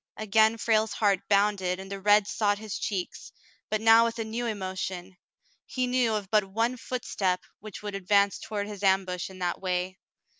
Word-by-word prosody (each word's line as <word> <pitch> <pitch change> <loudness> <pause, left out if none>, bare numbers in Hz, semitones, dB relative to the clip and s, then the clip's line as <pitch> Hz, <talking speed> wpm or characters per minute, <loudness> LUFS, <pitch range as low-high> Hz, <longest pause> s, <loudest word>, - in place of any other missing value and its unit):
Again 220 +1 +3
Frale's 220 -1 +1
heart 200 -3 +2
bounded 200 -3 +2
and 195 +1 -9
the 195 0 -5
red 205 +1 +5
sought 205 0 0
his 215 -1 -6
cheek, 190 -4 -2 0.6
but 215 - 0
now 225 +1 +7
with 230 0 -3
a 225 - -2
new 230 +2 -3
emotion. 190 -3 -5 0.5
He 255 -1 -1
knew 245 -3 +1
of 200 -2 -5
but 215 -1 +4
one 225 +6 -1
footstep 205 -8 -2 0.2
which 210 -1 -10
would 205 -1 -5
ad 190 -2 -8
vance 200 0 +3
toward 205 -1 -4
his 205 -2 -8
ambush 190 -2 +1
in 190 - -12
that 180 -1 -2
way. 185 0 -2
205 Hz, 185 wpm, -27 LUFS, 190-220 Hz, 0.6 s, now